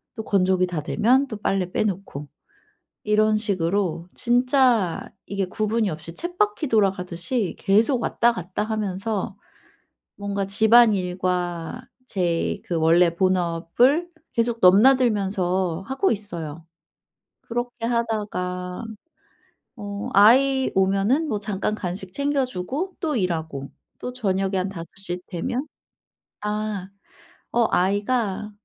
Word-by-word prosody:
또 220 - -5
건조기 185 -2 +2
다 170 -4 -3
되면 250 - +2
또 215 -4 -6
빨래 190 -3 -1
빼 - - +1
놓고. 185 -8 -4 0.8
이런 215 0 +4
식으로 185 -4 -1
진짜 245 - +2 0.2
이게 200 -1 -2
구분이 215 +1 0
없이 160 +2 -7
쳇바퀴 355 0 -1
돌아가듯이 195 0 0
계속 225 +5 +2
왔다 235 +1 +2
갔다 185 +2 -4
하면서 205 -1 -3 0.8
뭔가 200 -1 -3
집안일과 185 -3 +2 0.2
제 175 -6 -1
그 175 - -4
원래 165 +1 +4
본업을 185 - +2 0.2
계속 230 -1 0
넘나들면서 195 -5 +3
하고 330 +9 +1
있어요. 165 -6 -6 0.8
그렇게 240 0 -4
하다가 205 -5 -2 0.9
어 205 +2 -5
아이 265 +6 +5
오면은 195 +11 +2
뭐 210 -5 -1
잠깐 205 0 -2
간식 185 -1 -5
챙겨주고 280 - -2
또 310 -5 -1
일하고 160 - -2 0.3
또 250 - -5
저녁에 195 -4 -1
한 185 +1 -1
5:00 180 0 -6
되면 245 - -3 0.7
아. 210 -2 -3 0.6
어 235 -1 +3
아이가 205 +2 0
200 Hz, 220 characters per minute, -23 LUFS, 180-235 Hz, 0.9 s, 아이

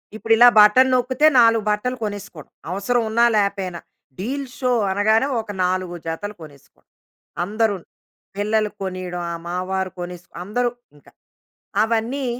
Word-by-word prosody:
ఇప్పుడిలా 225 +2 +5
button 210 +5 +6
నొక్కితే 255 +4 +3
నాలుగు 230 -2 +4
బట్టలు 210 +5 -1
కొనేసుకోవడం, 200 -7 -7 0.2
అవసరం 200 +6 0
ఉన్నా 235 +2 +3
లేపోయినా. 195 -4 -1 0.4
డీల్ 270 +8 -3
షో 255 -2 0 0.2
అనగానే 220 +6 +2
ఒక 220 -2 -6
నాలుగు 180 -1 -1
జతలు 205 +6 -5
కొనేసుకోవడం. 145 -3 -16 0.5
అందరూను. 205 -1 -1 0.5
పిల్లలు 210 +1 0
కొనియడం 185 -2 -4
ఆహ్, 170 - -5
మావారు 185 +1 -2
కొనేస్ 175 0 -7 0.2
అందరూ 240 +6 -1 0.3
ఇంక. 145 - -22 0.8
అవన్నీ 230 +5 -1
210 Hz, 120 wpm, -21 LUFS, 185-230 Hz, 0.8 s, button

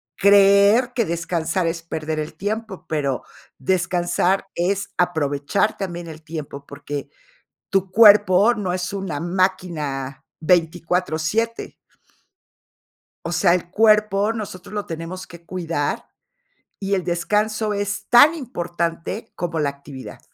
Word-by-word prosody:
creer 200 +5 +5
que 235 - +1
descansar 170 +1 -1
es 165 0 -2
perder 160 -1 -4
el 150 - -5
tiempo, 215 0 -4
pero 140 -4 -1 0.3
descansar 175 +4 +1
es 195 +3 -1
aprovechar 160 +2 0
también 175 -3 -5
el 160 0 -9
tiempo, 150 -3 -7
porque 145 0 -6 0.6
tu 195 -1 0
cuerpo 210 0 +6
no 195 -4 -2
es 180 +2 -3
una 190 -7 -3
máquina 165 -7 -2 0.2
24,7.. 175 +5 0 1.5
O 170 - -3
sea, 175 +1 +3
el 175 -1 -3
cuerpo 210 0 +3
nosotros 210 -3 -7
lo 205 - -2
tenemos 165 +3 -6
que 170 -1 -14
cuidar, 165 -5 -2 0.7
y 200 0 -1
el 185 -3 -1
descanso 210 +5 0
es 205 0 -3
tan 285 +7 +7
importante 175 - -4
como 170 -2 -3
la 150 -2 +1
actividad. 140 -1 -9
180 Hz, 120 wpm, -22 LUFS, 165-200 Hz, 1.5 s, tan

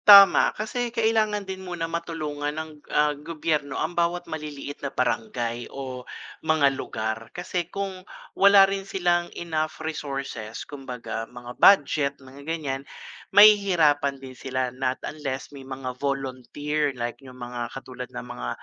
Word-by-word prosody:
Tama 200 -2 +10
kasi 240 +3 -2
kailangan 220 -3 +1
din 190 0 -6
muna 175 -3 -3
matulungan 160 -3 -3
ng, 160 0 -4 0.2
ah, 150 0 +3
gobyerno 150 -1 -2
ang 160 +3 -1
bawat 175 +1 0
maliliit 150 -2 -6
na 140 - -2
barangay 120 -2 -1
o 130 -2 -6 0.4
mga 155 -3 +3
lugar 110 -3 -4
kasi 175 -1 -2
kung 195 -2 -4 0.3
wala 200 0 +8
rin 195 0 -2
silang 175 -3 0
enough 155 -1 -2
resources 135 -8 -5
kumbaga 125 -5 -6
mga 120 0 -9
budget 145 -6 +6
mga 135 +1 -13
ganyan, 145 -5 -2 0.5
mahihirapan 175 -9 +6
din 135 -1 -10
sila 130 -1 -2
not 130 +1 -1
unless 140 -3 -5
may 140 - -9
mga 130 -1 -5
volunteer 140 +2 -1
like 120 +2 -4
yung 130 -2 -12
mga 120 -1 -5
katulad 125 -1 -8
ng 125 -1 -7
mga - - -5
145 Hz, 140 wpm, -25 LUFS, 130-175 Hz, 0.5 s, Tama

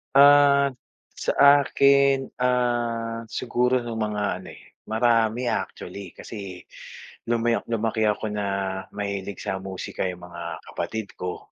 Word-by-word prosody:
Ah, 140 0 +7 0.4
sa - - -2 0.3
akin, 140 -1 +4 0.2
ah, 120 -2 0
siguro 125 +2 0
no'ng 115 -1 -5
mga 105 -1 -1 0.2
ano 95 - -12
eh, - - -16 0.2
marami 115 +1 +2
actually, 100 -3 -5
kasi 95 -5 -8 0.6
lumayo 115 0 +1
lumaki 110 -1 0
ako 105 0 -1
na 105 -1 -2 0.5
mahilig 100 -1 -4
sa 95 - -2
musika 95 0 -4
'yung 90 -1 -6
mga 85 -1 -7
kapatid 110 -2 -4
ko. 90 0 -6
115 Hz, 120 wpm, -25 LUFS, 100-125 Hz, 0.6 s, Ah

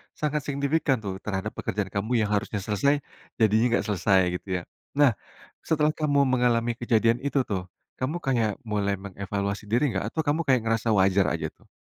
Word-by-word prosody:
sangat 150 -2 -1
signifikan 140 -1 0
tuh 100 -3 -5
terhadap 95 -2 -3
pekerjaan - - -2
kamu 105 +4 -3 0.2
yang - - -7
harusnya 100 0 -1
selesai, 140 +9 +1 0.4
jadinya 110 +1 +4
enggak - - -2
selesai 95 -1 +3 0.2
gitu - - -33
ya. - - -8 0.4
Nah, 130 -7 +5 0.5
setelah 155 -1 +2
kamu 145 -2 +2
mengalami 120 -2 +2
kejadian 115 0 +2
itu 140 -1 +1
tuh, 95 -3 -2 0.4
kamu 150 +7 -2
kayak 120 -6 +1 0.2
mulai 100 -1 0
mengevaluasi 100 +1 -4
diri 120 -2 +2
nggak? 100 +4 -2
Atau 160 - -1
kamu 160 +3 +2
kayak 130 -4 +3
ngerasa 115 0 +1
wajar 95 -1 +3
aja - - -2
tuh? - - -26
115 Hz, 175 wpm, -26 LUFS, 100-140 Hz, 0.5 s, Nah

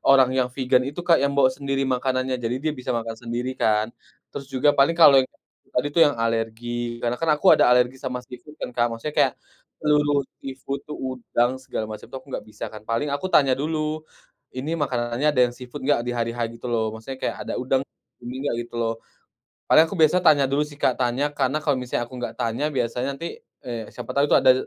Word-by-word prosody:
orang 135 -2 +5
yang 130 -1 +1
vegan 125 0 +2
itu 160 +5 -6
Kak, 170 -5 +5
yang 140 0 0
bawa 130 -2 +5
sendiri 135 0 -2
makanannya, 130 0 0
jadi 120 +2 -1
dia 155 - +1
bisa 130 -4 -10
makan 115 -1 -3
sendiri 120 +2 -3
kan. 110 +1 +2 0.4
Terus 140 -1 -7
juga, 140 +2 +3
paling 145 +4 +3
kalo 140 -5 +8
yang 130 - -3 0.5
tadi 145 +3 +1
tuh 170 - +2
yang 145 - -3
alergi 115 +1 -2
karena 120 0 +1
kan 165 - 0
aku 185 +5 +6
ada - - +4
alergi 125 +1 +3
sama 125 -2 -4
seafood 125 +5 -12
kan 125 - -6
Kak, 120 0 +2
maksudnya 150 +6 -5
kayak, - - +3 0.4
seluruh 145 -2 +2 0.2
seafood 135 +1 -5
tuh, 150 - -5
udang 130 0 -1
segala 110 -4 -4
macem 110 -1 -8
tuh, - - -8
aku 135 +1 -11
enggak - - -4
bisa 105 0 -7
kan. 110 - -9
Paling 115 +6 0
aku 145 +6 -2
tanya 135 -3 +5
dulu, 155 +1 -2 0.5
"Ini 140 +6 -3
makanannya 125 -1 0
ada 125 - +2
yang 120 - -10
seafood 125 +3 -9
enggak" 145 -4 +3
di 120 - -2
hari-H 115 0 -2 0.2
gitu - - -7
loh 110 -2 0
maksudnya 115 +4 -7
kayak - - -1
ada - - -3
udang 130 +1 +1 0.4
gini 120 +1 -7
enggak 145 - 0
gitu 120 - -19
loh. 115 0 +1 0.7
Padahal, 160 +1 +6
aku - - -5
biasanya 160 +3 +5
tanya 145 -3 +6
dulu 140 +2 +2
sih 145 - -12
Kak, 130 - +3
tanya 125 +3 +1
karena 135 0 0
kalo 145 - +2
misalnya 125 -1 -2
aku 125 - -17
enggak 120 - -4
tanya, 120 +4 -1
biasanya 125 +1 -1
nanti, 170 - -4 0.4
eee, 120 -2 -4
siapa - - -6
tau 140 - +3
itu - - +5
ada 130 - +6
130 Hz, 215 wpm, -24 LUFS, 120-145 Hz, 0.7 s, kalo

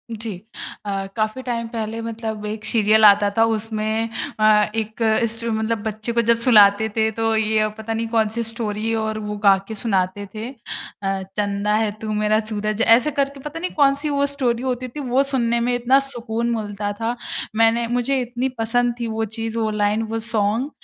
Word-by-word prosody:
जी 220 0 -5 0.5
अ, 195 -1 -2
काफ़ी 215 +3 -1
टाइम 235 -2 -2
पहले 225 -1 -4
मतलब 220 -2 -5
एक 215 +1 -5
सीरियल 220 -1 +4
आता 205 0 +6
था 225 - +6
उसमें 220 0 -1 0.3
अ, 210 -1 +4
एक 220 +1 -3 0.3
स्टो 230 0 -3
मतलब 220 0 -1
बच्चे 220 +2 -3
को 235 - +3
जब 230 - +5
सुलाते 210 -2 +6
थे 220 0 +2
तो 225 +1 0
ये 220 0 +2
अब 215 0 0
पता 220 +1 -4
नहीं 225 0 -2
कौन 220 -2 +2
सी 235 - -1
स्टोरी 225 -1 -3
और 220 0 -2
वो 210 0 -4
गा 195 -1 +7
के 220 - -6
सुनाते 195 -2 -1
थे 220 +3 -4
अ, 195 -5 -5 0.2
चंदा 205 0 0
है 215 -1 +1
तू 215 -1 -3
मेरा 215 +1 +2
सूरज 215 +1 -2
ऐसे 240 +6 +5
करके 275 0 -1
पता 295 +4 -7
नहीं 365 - -3
कौन 275 -2 +4
सी 295 +1 -3
वो 280 0 +1
स्टोरी 255 -4 -1
होती 255 -1 -2
थी 295 +5 -8
वो 265 0 +2
सुनने 235 -4 0
में 245 +1 0
इतना 250 +3 +4
सुकून 235 -3 -3
मिलता 205 -1 -3
था। 230 +3 -2 0.4
मैंने 225 +1 +3
मुझे 245 +3 0
इतनी 245 +2 -2
पसंद 240 +2 +1
थी 235 - -2
वो 225 0 -2
चीज़ 225 0 -3
वो 220 -1 0
लाइन 210 +1 +1
वो 225 0 -2
सॉन्ग 225 +3 0
225 Hz, 195 wpm, -21 LUFS, 215-235 Hz, 0.5 s, गा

